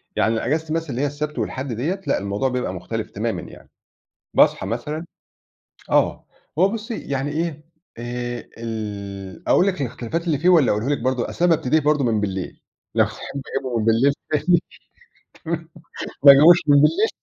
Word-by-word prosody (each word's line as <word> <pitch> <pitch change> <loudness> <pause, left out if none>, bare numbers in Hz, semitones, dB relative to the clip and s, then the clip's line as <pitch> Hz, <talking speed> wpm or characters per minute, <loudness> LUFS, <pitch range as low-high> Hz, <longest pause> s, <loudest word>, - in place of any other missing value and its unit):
يعني 110 - +2
أنا 115 - -2
إجازتي 155 +4 -1
مثلًا 165 -1 -2
اللي 125 0 -2
هي 145 - +2
السبت 150 +1 -4
والحد 130 -1 -3
ديّة، 160 - -2
لأ - - +2
الموضوع 100 +6 -1
بيبقى 125 0 -2
مُختلف - - -5
تمامًا - - -2
يعني. - - -13 0.7
باصحى - - +4
مثلًا 155 +2 -4 0.9
آه. - - +2 0.3
هو 185 - +6
بُصّي 225 +1 -5
يعني 140 +1 -3
إيه، 155 -1 -3 0.3
آآ 120 0 -4
ال 100 -4 -6
أقول 190 - +4
لِك 185 -5 -1
الإختلافات 130 +6 -3
اللي 155 - +2
فيه 170 +6 +2
والّا 160 -8 +5
أقولهُ 105 +6 -1
لِك 145 - 0
برضه 130 0 -1
أصل 175 - 0
أنا 170 -2 +5
بابتدي 155 +1 +1
برضه 150 -1 +2
من 110 -4 +1
بالليل 95 -3 -4 0.3
لو - - +5
تحبّي 140 - -7 0.2
أجيبه 130 -3 -2
من 110 - -1
بالليل 120 +5 +4 0.2
تاني، 150 -2 +1
تمام، 175 -2 +5 1.6
ما 140 - +12
أجيبوش 155 +6 +8
من 145 - +6
بالليل 395 - +3
140 Hz, 175 wpm, -22 LUFS, 115-160 Hz, 1.6 s, ما